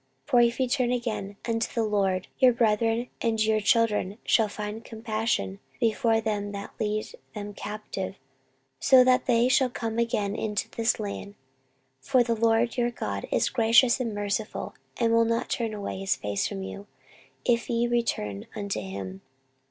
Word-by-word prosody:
14:030:009 - - -17
For 245 - +6
if 235 +1 +2
ye 260 - +2
turn 245 -1 +1
again 220 -5 -3
unto 225 -1 -1
the 230 - +2
LORD, 195 -3 0
your 255 -2 +7
brethren 230 +1 +1
and 225 -2 0
your 215 0 +3
children 210 -3 +2
shall 220 -2 +3
find 210 +2 -6
compassion 220 - -2 0.2
before 225 0 +2
them 205 -2 -2
that 200 0 -7
lead 215 0 -2 0.2
them 205 0 -6
captive, 205 -2 -5 0.6
so 260 -1 +7
that 255 0 +3
they 240 -1 +4
shall 260 0 +3
come 230 -1 -3
again 210 -3 0
into 210 -2 -2
this 230 0 +1
land: 200 -1 -5 0.6
for 245 - +3
the 235 -1 0
LORD 230 +1 +2
your 240 -1 +2
God 100 - -4
is - - +2
gracious 235 +1 +5
and 230 -4 -2
merciful, 205 +1 -3 0.2
and 230 -1 +2
will 230 0 +5
not 230 0 0
turn 230 -2 -1
away 205 -2 -5
his 195 0 +1
face 105 -1 -2
from 95 - -5
you, 95 +1 -8 0.6
if 235 0 +1
ye 235 0 +1
return 165 - -1
unto 200 - -3
him. 95 -1 -6
220 Hz, 165 wpm, -27 LUFS, 205-235 Hz, 0.6 s, your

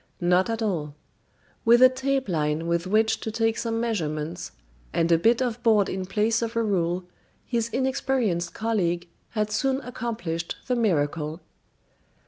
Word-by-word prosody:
Not 180 +3 +3
at 225 0 -1
all. 155 -8 -2 0.7
With 235 +1 +6
a - - +11
tape 265 +1 -1
line 155 -2 0
with 170 +1 0
which 220 +3 +2
to - - -4
take 225 0 +1
some 225 -1 -2
measurements, 170 -7 -2 0.4
and 165 0 +1
a 165 - +6
bit 230 +7 +3
of 240 -1 -3
board 220 -4 +4
in 190 -1 -3
place 220 +4 +1
of 230 0 -3
a 230 - +2
rule, 180 -3 0 0.4
his 230 -2 -1
inexperienced 250 -9 0
colleague 180 -6 0 0.3
had 210 0 0
soon 270 +4 +1
accomplished 225 -10 -4
the 250 - 0
miracle. 160 -7 0
215 Hz, 150 wpm, -25 LUFS, 170-230 Hz, 0.7 s, a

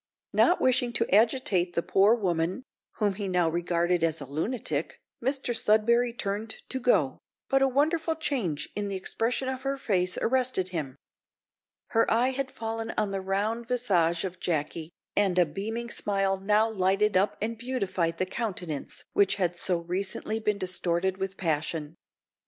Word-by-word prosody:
Not 355 - +4
wishing 250 -1 +2
to 230 - +1
agitate 210 -6 +2
the 170 - +1
poor 200 +4 +4
woman, 180 +1 -1 0.3
whom 205 -2 0
he 200 +1 -4
now 180 -2 +2
regarded 175 +1 +1
as 165 -1 +1
a 140 - -6
lunatic, 155 - -3 0.2
Mr 265 -2 0
Sudberry 230 +2 +3
turned 215 0 -4
to 260 - -3
go, 150 - +2 0.3
but 270 0 +3
a 270 - +5
wonderful 315 +5 +1
change 235 - -2
in 205 -1 -2
the 200 - -3
expression 230 +7 -1
of 260 0 -3
her 275 +1 -2
face 185 -7 0
arrested 250 -7 +1
him. 150 -7 -4 0.9
Her 225 0 +2
eye 240 +3 +3
had 265 0 -3
fallen 225 -1 -4
on 210 -2 +1
the 195 -1 -2
round 210 +5 -1
visage 185 -10 +1
of 180 -1 -6
Jacky, 155 -1 -2 0.3
and 195 -3 +2
a 180 - +6
beaming 220 +9 -4
smile 195 -1 +1
now 210 +3 +3
lighted 200 0 +1
up 195 +3 +3
and 225 +3 -2
beautified 195 -9 -2
the 185 - 0
countenance 185 -7 -4
which 200 -1 +3
had 180 -3 0
so 175 0 0
recently 190 +5 -2
been 210 -2 0
distorted 185 -1 0
with 195 0 -4
passion. 155 -2 -2
200 Hz, 160 wpm, -28 LUFS, 175-235 Hz, 0.9 s, a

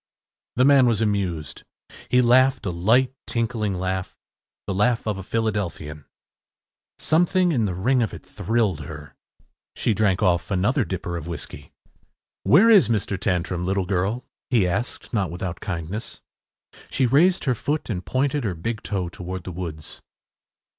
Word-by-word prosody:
The 125 - +4
man 140 -2 +6
was 115 -3 +2
amused. 95 -8 -2 0.5
He 125 0 +4
laughed 130 0 +4
a 95 - -1
light 115 +10 +2
tinkling 115 -4 -1
laugh, 95 0 -3 0.5
the 100 - -2
laugh 115 +5 +1
of 105 -3 -2
a - - -6
Philadelphian. 95 -9 -3 0.9
Something 175 +2 +2
in 120 -8 +1
the 95 -3 -2
ring 125 +8 +2
of 110 - 0
it - - -10
thrilled 110 -7 0
her. 75 -1 -9 0.6
She 115 - +1
drank 100 -1 +1
off 90 -3 +2
another 105 +8 +1
dipper 90 -2 -4
of 85 - -7
whiskey. 75 -4 -7 0.7
“Where 185 - +6
is 190 - +6
Mr. 105 -3 0
Tantrum, 90 -2 -1
little 95 +1 0
girl?” 100 +6 -1 0.2
he 115 -8 +3
asked, 105 +8 -3
not 100 -6 +1
without 90 0 -5
kindness. 90 +2 -5 0.7
She 130 - +1
raised 165 +9 +4
her 130 - +2
foot 145 +6 -2
and 90 -6 -3
pointed 135 +4 0
her 100 -5 -2
big 110 +7 -4
toe 95 -4 -2
toward 90 +1 -6
the 90 - -6
woods. 80 -3 -7
100 Hz, 155 wpm, -23 LUFS, 90-120 Hz, 0.9 s, man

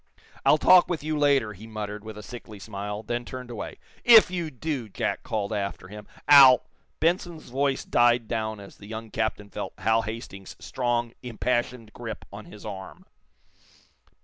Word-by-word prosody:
"I'll 150 - +5
talk 180 +3 +6
with 170 -4 -3
you 155 0 -1
later," 140 -7 +2
he 105 +3 -12
muttered, 105 -1 -6
with 110 -1 -9
a 105 - -9
sickly 110 -2 -10
smile, 105 +1 -6
then 120 +2 -3
turned 125 0 -8
away. 115 - -6 0.3
"If 225 -6 +8
you 175 -3 -2
do," 135 -4 -4
Jack - - -2
called 105 -1 -3
after 100 -2 -4
him, 105 0 -10 0.2
"I'll 135 -3 +9 0.2
" - - -44
Benson's 170 -2 -1
voice 135 +2 0
died 120 -1 +3
down 110 -2 -3
as 100 -1 -12
the 100 - -13
young 110 0 -7
captain 110 -2 -2
felt - - -5
Hal 115 0 +2
Hastings's 110 -3 -8
strong, 120 -2 -2
impassioned 120 -1 -2
grip 115 -3 -7
on 105 +1 -9
his 105 - -13
arm. 95 -3 -8
115 Hz, 170 wpm, -26 LUFS, 105-130 Hz, 0.3 s, I'll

